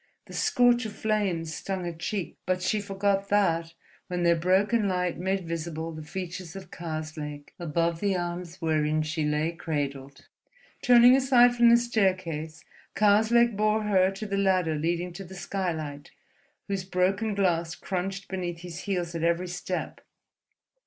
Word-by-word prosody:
The -, -, -12 dB
scorch 245 Hz, -1 st, +3 dB
of 210 Hz, -, -8 dB
flames 195 Hz, -8 st, -1 dB
stung 190 Hz, +1 st, -4 dB
her 170 Hz, -, -3 dB
cheek, 175 Hz, +3 st, -4 dB
but 185 Hz, 0 st, 0 dB
she 210 Hz, +3 st, +1 dB
forgot 200 Hz, 0 st, -1 dB
that 170 Hz, -5 st, +1 dB, 0.3 s
when 180 Hz, -1 st, -2 dB
their 170 Hz, 0 st, +4 dB
broken 195 Hz, +6 st, +2 dB
light 180 Hz, -2 st, -1 dB
made 190 Hz, -1 st, -1 dB
visible 165 Hz, 0 st, -4 dB
the 155 Hz, -1 st, -8 dB
features 180 Hz, +1 st, -6 dB
of 185 Hz, -2 st, -9 dB
Karslake 155 Hz, -3 st, -6 dB
above 170 Hz, 0 st, 0 dB
the 195 Hz, -1 st, +1 dB
arms 175 Hz, 0 st, -5 dB
wherein 155 Hz, -1 st, +1 dB
she 155 Hz, 0 st, -2 dB
lay 150 Hz, +2 st, 0 dB
cradled. 140 Hz, -5 st, -4 dB, 0.6 s
Turning 245 Hz, +1 st, +7 dB
aside 250 Hz, -2 st, +5 dB
from 240 Hz, -1 st, +6 dB
the 235 Hz, -, +7 dB
staircase, 185 Hz, -9 st, -1 dB, 0.3 s
Karslake 220 Hz, +4 st, +4 dB
bore 215 Hz, +1 st, +1 dB
her 190 Hz, -3 st, +3 dB
to 195 Hz, +3 st, -6 dB
the 200 Hz, -1 st, -2 dB
ladder 185 Hz, -4 st, +2 dB
leading 170 Hz, +3 st, -1 dB
to 195 Hz, +2 st, -7 dB
the 190 Hz, +1 st, -11 dB
skylight, 160 Hz, -7 st, -4 dB, 0.6 s
whose 195 Hz, -2 st, -2 dB
broken 190 Hz, +3 st, 0 dB
glass 175 Hz, -4 st, +1 dB
crunched 195 Hz, +1 st, -4 dB
beneath 175 Hz, -3 st, -4 dB
his 175 Hz, -1 st, -7 dB
heels 175 Hz, -4 st, -2 dB
at 165 Hz, -, -3 dB
every 170 Hz, +2 st, +1 dB
step. 180 Hz, -, -4 dB
180 Hz, 150 wpm, -27 LUFS, 165-200 Hz, 0.6 s, Turning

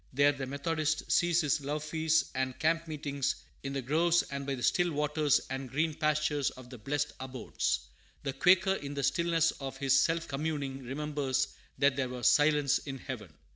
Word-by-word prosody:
There 140 Hz, +2 st, +5 dB
the 135 Hz, -2 st, -5 dB
Methodist 155 Hz, +3 st, -1 dB
sees 175 Hz, 0 st, +3 dB
his 150 Hz, -2 st, +1 dB
love 145 Hz, +2 st, -3 dB
feasts 160 Hz, +1 st, +1 dB
and 130 Hz, -1 st, -2 dB
camp 165 Hz, +1 st, +1 dB
meetings 145 Hz, -3 st, -2 dB, 0.3 s
in 135 Hz, 0 st, -4 dB
the 135 Hz, -1 st, -2 dB
groves 165 Hz, +6 st, +3 dB
and 140 Hz, 0 st, -4 dB
by 140 Hz, -, -1 dB
the 125 Hz, -, -7 dB
still 175 Hz, -1 st, +2 dB
waters 150 Hz, 0 st, +2 dB
and 135 Hz, -1 st, -4 dB
green 155 Hz, +4 st, 0 dB
pastures 150 Hz, -2 st, +1 dB
of 130 Hz, -1 st, -13 dB
the 125 Hz, -, -9 dB
blessed 145 Hz, +5 st, -2 dB
abodes. 130 Hz, -1 st, -2 dB, 0.4 s
The 135 Hz, -, -2 dB
Quaker, 185 Hz, +7 st, +4 dB
in 145 Hz, -6 st, -5 dB
the 140 Hz, -, -2 dB
stillness 165 Hz, +3 st, +2 dB
of 135 Hz, -1 st, -7 dB
his 135 Hz, 0 st, +3 dB
self 165 Hz, 0 st, 0 dB
communing, 140 Hz, -2 st, -3 dB
remembers 135 Hz, 0 st, -1 dB, 0.3 s
that 140 Hz, -1 st, +3 dB
there 130 Hz, -2 st, 0 dB
was 125 Hz, -1 st, 0 dB
"silence 145 Hz, -2 st, +4 dB
in 135 Hz, -2 st, -6 dB
heaven." 120 Hz, -8 st, -7 dB
145 Hz, 180 wpm, -31 LUFS, 135-155 Hz, 0.4 s, There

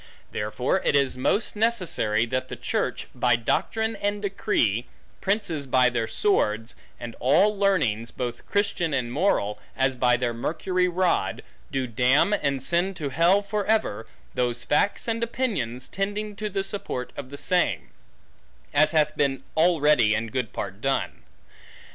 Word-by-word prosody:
Therefore 125 Hz, -, -1 dB
it -, -, +2 dB
is 140 Hz, -2 st, +2 dB
most 200 Hz, -, 0 dB
necessary, 180 Hz, -, +1 dB
that 130 Hz, +2 st, -2 dB
the -, -, -6 dB
church, -, -, -2 dB
by 120 Hz, -1 st, +3 dB
doctrine 220 Hz, -, -1 dB
and 205 Hz, 0 st, -1 dB
decree, 165 Hz, -, 0 dB, 0.3 s
princes 190 Hz, -8 st, -1 dB
by 125 Hz, -1 st, +4 dB
their 115 Hz, -2 st, -1 dB
sword, 110 Hz, -, +1 dB, 0.3 s
and 120 Hz, -1 st, -7 dB
all 195 Hz, +11 st, +4 dB
learnings, 155 Hz, -, +1 dB
both 120 Hz, -1 st, -5 dB
Christian 180 Hz, -6 st, 0 dB
and 120 Hz, -3 st, -2 dB
moral, 105 Hz, -, +1 dB, 0.2 s
as 135 Hz, 0 st, +2 dB
by 125 Hz, 0 st, +3 dB
their 120 Hz, -1 st, -1 dB
Mercury 180 Hz, +9 st, -1 dB
rod, 180 Hz, 0 st, 0 dB, 0.3 s
do 135 Hz, -1 st, -1 dB
damn 125 Hz, -, +3 dB
and 140 Hz, -9 st, 0 dB
send 180 Hz, +3 st, 0 dB
to 150 Hz, -5 st, -3 dB
hell 170 Hz, +8 st, +3 dB
for 205 Hz, +1 st, -2 dB
ever, 115 Hz, -, 0 dB, 0.3 s
those 120 Hz, -1 st, -1 dB
facts 200 Hz, +10 st, +1 dB
and 230 Hz, 0 st, -1 dB
opinions 205 Hz, -, -2 dB
tending 205 Hz, +2 st, -3 dB
to 210 Hz, +1 st, -3 dB
the 195 Hz, -1 st, -2 dB
support 195 Hz, -10 st, -4 dB
of 130 Hz, -, -7 dB
the 140 Hz, -, -8 dB
same; 175 Hz, -, +1 dB, 0.8 s
as 155 Hz, +2 st, +4 dB
hath 150 Hz, -1 st, +2 dB
been 135 Hz, -2 st, 0 dB
already 150 Hz, -9 st, +4 dB
in 110 Hz, +1 st, -2 dB
good 125 Hz, -4 st, -2 dB
part 95 Hz, +3 st, -6 dB
done. 135 Hz, +1 st, -1 dB
140 Hz, 150 wpm, -25 LUFS, 120-195 Hz, 0.8 s, by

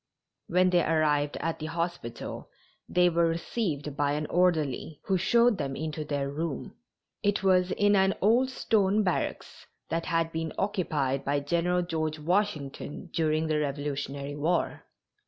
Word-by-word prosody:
When 180 Hz, +1 st, +3 dB
they 175 Hz, -1 st, +4 dB
arrived 150 Hz, -2 st, +1 dB
at 165 Hz, 0 st, -2 dB
the 155 Hz, -, -4 dB
hospital 165 Hz, -7 st, -4 dB, 0.4 s
they 180 Hz, 0 st, +4 dB
were 170 Hz, -1 st, +3 dB
received 165 Hz, -4 st, -2 dB
by 145 Hz, -1 st, +1 dB
an 150 Hz, +1 st, -1 dB
orderly, 160 Hz, -5 st, +1 dB
who 195 Hz, -, +1 dB
showed 235 Hz, +4 st, +3 dB
them 135 Hz, -2 st, -2 dB, 0.2 s
to 155 Hz, +1 st, -4 dB
their 145 Hz, -2 st, -2 dB
room. 150 Hz, +2 st, -4 dB, 0.5 s
It 205 Hz, -1 st, +1 dB
was 185 Hz, -1 st, +4 dB
in 205 Hz, +2 st, +3 dB
an 190 Hz, 0 st, +3 dB
old 240 Hz, +6 st, +3 dB
stone 215 Hz, -4 st, +2 dB
barracks, 180 Hz, -3 st, -3 dB, 0.2 s
that 165 Hz, 0 st, -2 dB
had 165 Hz, -1 st, +1 dB
been 160 Hz, -1 st, -3 dB
occupied 150 Hz, -9 st, 0 dB
by 145 Hz, +1 st, +1 dB
General 170 Hz, +4 st, +1 dB
George 155 Hz, -2 st, -2 dB
Washington 160 Hz, -2 st, -2 dB
during 155 Hz, -1 st, +1 dB
the 155 Hz, -1 st, +1 dB
Revolutionary 140 Hz, -1 st, -3 dB
War. 160 Hz, +4 st, -1 dB
165 Hz, 145 wpm, -28 LUFS, 145-180 Hz, 0.5 s, they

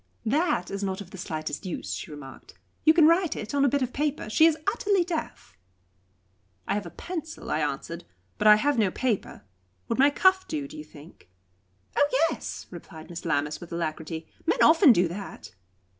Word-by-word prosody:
"That 275 Hz, -, +1 dB
is 200 Hz, +1 st, -4 dB
not 190 Hz, -1 st, -2 dB
of 195 Hz, -3 st, -9 dB
the -, -, -9 dB
slightest 155 Hz, -2 st, -4 dB
use," 185 Hz, -4 st, -4 dB
she -, -, -6 dB
remarked. 145 Hz, -3 st, -11 dB, 0.3 s
"You 315 Hz, -, +8 dB
can 320 Hz, -1 st, +5 dB
write 335 Hz, 0 st, +3 dB
it 215 Hz, +4 st, -6 dB
on 280 Hz, -1 st, +2 dB
a 280 Hz, -, +4 dB
bit 280 Hz, +1 st, +1 dB
of 255 Hz, -, -4 dB
paper. 290 Hz, -6 st, -2 dB
She 315 Hz, +8 st, +6 dB
is 320 Hz, -2 st, +2 dB
utterly 400 Hz, -3 st, +2 dB
deaf." 330 Hz, -, -6 dB, 1.1 s
"I -, -, +1 dB
have 205 Hz, 0 st, -2 dB
a -, -, -7 dB
pencil," 325 Hz, -3 st, -6 dB
I -, -, +1 dB
answered, 150 Hz, +3 st, -3 dB, 0.4 s
"but 210 Hz, -, +3 dB
I 210 Hz, -, +10 dB
have 280 Hz, +3 st, +1 dB
no 210 Hz, -3 st, +3 dB
paper. 225 Hz, -, -2 dB, 0.5 s
Would 230 Hz, -, -1 dB
my 280 Hz, +2 st, +7 dB
cuff 375 Hz, +5 st, +3 dB
do, 295 Hz, -3 st, -3 dB
do 310 Hz, -, -12 dB
you 305 Hz, -, -7 dB
think?" 155 Hz, -, -16 dB, 0.7 s
"Oh 290 Hz, 0 st, +3 dB, 0.2 s
yes!" -, -, -6 dB
replied 160 Hz, +1 st, -11 dB
Miss 170 Hz, -, -7 dB
Lammas, 150 Hz, -2 st, -1 dB
with 175 Hz, -, -10 dB
alacrity; 160 Hz, -1 st, -4 dB, 0.2 s
"men -, -, +3 dB
often 325 Hz, -2 st, +7 dB
do 180 Hz, -5 st, +3 dB
that." 195 Hz, +4 st, -8 dB
215 Hz, 190 wpm, -26 LUFS, -, 1.1 s, I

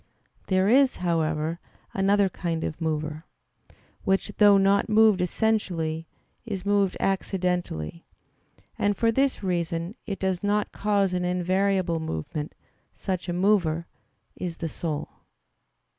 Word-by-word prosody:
There 190 Hz, 0 st, +2 dB
is, 260 Hz, +4 st, +5 dB
however, 160 Hz, -1 st, -1 dB, 0.3 s
another 195 Hz, +1 st, +3 dB
kind 170 Hz, -3 st, -3 dB
of 155 Hz, -, -4 dB
mover, 155 Hz, -1 st, -2 dB, 0.8 s
which, 195 Hz, +2 st, +1 dB
though 205 Hz, -1 st, +7 dB
not 195 Hz, +2 st, +3 dB
moved 215 Hz, -3 st, +5 dB
essentially, 175 Hz, -5 st, 0 dB, 0.4 s
is 200 Hz, -5 st, -5 dB
moved 200 Hz, -2 st, +2 dB
accidentally; 180 Hz, -, -2 dB, 0.7 s
and 205 Hz, 0 st, +1 dB
for 230 Hz, -1 st, +3 dB
this 270 Hz, -1 st, +1 dB
reason 170 Hz, -1 st, -1 dB
it 200 Hz, -2 st, -3 dB
does 190 Hz, -2 st, -1 dB
not 205 Hz, +1 st, +1 dB
cause 200 Hz, -2 st, +1 dB
an 180 Hz, 0 st, 0 dB
invariable 180 Hz, 0 st, +1 dB
movement; 150 Hz, -, -4 dB, 0.4 s
such 185 Hz, -1 st, -4 dB
a -, -, 0 dB
mover, 175 Hz, -4 st, +2 dB, 0.5 s
is 175 Hz, -2 st, -5 dB
the 165 Hz, -, -3 dB
soul. 155 Hz, -2 st, -3 dB
185 Hz, 120 wpm, -26 LUFS, 165-200 Hz, 0.8 s, though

